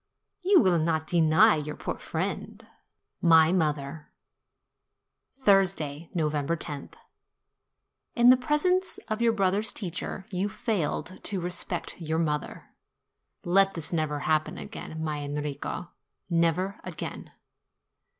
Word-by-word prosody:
You 380 0 +5
will 175 -3 +3
not 160 0 0
deny 170 +5 +5
your 150 0 -4
poor - - -5
friend?'' - - -4 0.6
MY 165 -1 +6
MOTHER 150 -3 -1 1.3
Thursday, 185 - +2
November 150 -1 0
loth. 145 -2 -7 1.2
In 240 +1 +7
the - - +8
presence 340 +8 +1
of 215 +1 -2
your 235 -1 +4
brother's 200 0 +1
teacher 185 0 -5
you 190 +2 -1
failed 205 -5 -2
in 195 - -1
respect 175 0 -3
to 175 - -9
your 160 0 -1
mother! 150 -3 -2 0.7
Let 195 +2 +3
this 165 0 -2
never 155 -3 -1
happen 155 -1 0
again, 160 0 -7
my 155 -2 -2
Enrico, 145 +3 -4 0.4
never 170 +4 +1
again - - -7
170 Hz, 115 wpm, -27 LUFS, 155-200 Hz, 1.3 s, the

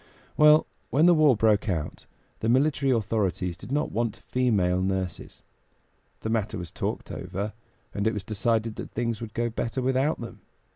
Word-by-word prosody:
Well, 150 0 +6 0.2
when 150 +5 +4
the 175 - +7
war 155 -7 +5
broke 105 -1 +3
out 80 -5 -3 0.3
the 110 - -1
military 135 +2 +2
authorities 100 -6 0
did - - -11
not 145 +2 0
want 115 -1 -1
female 100 -8 +2
nurses. 95 -2 -3 0.8
The 110 - -3
matter 110 -1 -1
was 90 -2 -7
talked - - -4
over, 95 +4 -4 0.4
and 100 +1 0
it 110 - +1
was 105 - -4
decided 110 +2 -1
that - - -6
things 115 -1 -2
would 110 -2 -7
go 120 0 0
better 115 +3 -3
without 130 +4 +1
them. 115 -1 -8
115 Hz, 165 wpm, -26 LUFS, 100-125 Hz, 0.8 s, the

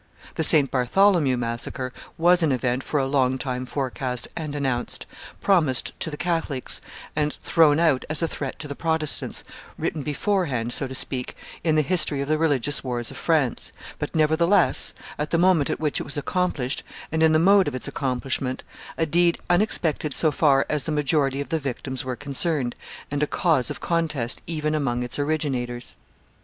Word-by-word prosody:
The 160 - -1
St. 150 -3 +4
Bartholomew 140 - +3
massacre 120 +2 -3 0.2
was 175 +2 +5
an 160 -3 +3
event 125 0 0
for 150 - -1
a 135 - +1
long 130 -1 +2
time 130 -1 -3
forecast 130 -1 -2
and 155 -3 -4
announced, 130 -4 -2 0.4
promised 155 -10 +2
to - - -3
the 150 - -6
Catholics 165 -6 0 0.3
and 150 -1 0
thrown 160 -3 +4
out 160 -6 +3
as 155 +1 +2
a - - +2
threat 140 -4 -5
to 150 - -6
the 140 - -4
Protestants, 160 0 -1 0.3
written 155 - -2
beforehand, 145 - -1
so 135 - -1
to 130 - -6
speak, 130 -1 -3 0.3
in 160 -2 +2
the 155 - +4
history 155 -3 +1
of 140 - -2
the 155 0 +2
religious 145 -3 +1
wars 120 -3 -2
of - - -9
France, 155 -7 +1 0.3
but, - - -4
nevertheless, 160 +5 +3 0.2
at 150 0 -1
the 165 - +2
moment 175 -4 +4
at - - -2
which 150 -2 0
it - - -3
was 145 - -4
accomplished, 145 -5 -1 0.3
and 160 +1 0
in 160 0 +6
the 155 - +5
mode 195 +4 +5
of - - -2
its 130 - -5
accomplishment, 130 -1 -2 0.3
a 165 - +2
deed 170 +2 +3
unexpected 170 -6 +1
so 155 - +3
far 140 -2 +3
as 150 -3 -1
the 160 - -2
majority 145 -2 +1
of 140 - -4
the 160 - 0
victims 130 -1 -4
were 130 -1 -3
concerned, 140 -2 -1 0.4
and 145 0 -1
a 150 - +2
cause 155 -9 +1
of - - -5
contest 155 -8 -1
even 155 -2 -1
amongst 125 -5 0
its 125 - -5
originators. 135 -5 -2
145 Hz, 180 wpm, -24 LUFS, 130-160 Hz, 0.4 s, in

